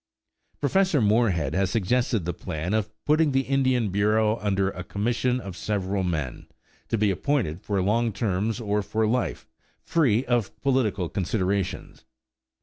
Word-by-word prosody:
Professor 180 +2 +2
Moorehead 105 - +2
has 95 -1 +1
suggested 115 0 0
the 85 - -2
plan 80 +5 -4
of 110 -1 0 0.2
putting 155 -1 +3
the 135 - +3
Indian 130 -4 +1
Bureau 105 +2 +2
under 100 -2 0
a 90 - -7
commission 120 +6 0
of 100 -7 -7
several 100 -1 -2
men, 80 -8 -3 0.4
to 115 - 0
be 105 -1 +2
appointed 100 - -1
for 100 -2 -1
long 115 +4 +1
terms 105 +2 -1
or 105 -2 0
for 110 +2 -1
life, 120 +3 -1 0.4
free 135 -7 +2
of 115 -3 -1
political 120 -9 +1
considerations. 95 0 -2
105 Hz, 145 wpm, -25 LUFS, 95-120 Hz, 0.4 s, putting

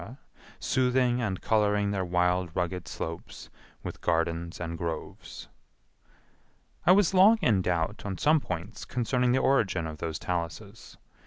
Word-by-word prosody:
soothing 125 -1 +1
and 95 -5 -2
coloring 105 -2 +2
their 95 -2 -1
wild 90 0 +1
rugged 90 0 -2
slopes 80 0 -7 0.3
with - - -7
gardens 85 0 -1
and 85 -1 -4
groves. 85 -2 -6 1.4
I - - +8
was 195 0 +4
long 195 +5 +7
in 105 -6 +3
doubt 90 +3 -1
on 95 -3 -4
some 155 - +4
points 90 - -6
concerning 125 +1 0
the 130 - +3
origin 95 -11 +2
of 80 -1 -7
those 80 -1 -3
taluses. 95 +7 -5
95 Hz, 135 wpm, -28 LUFS, 85-125 Hz, 1.4 s, I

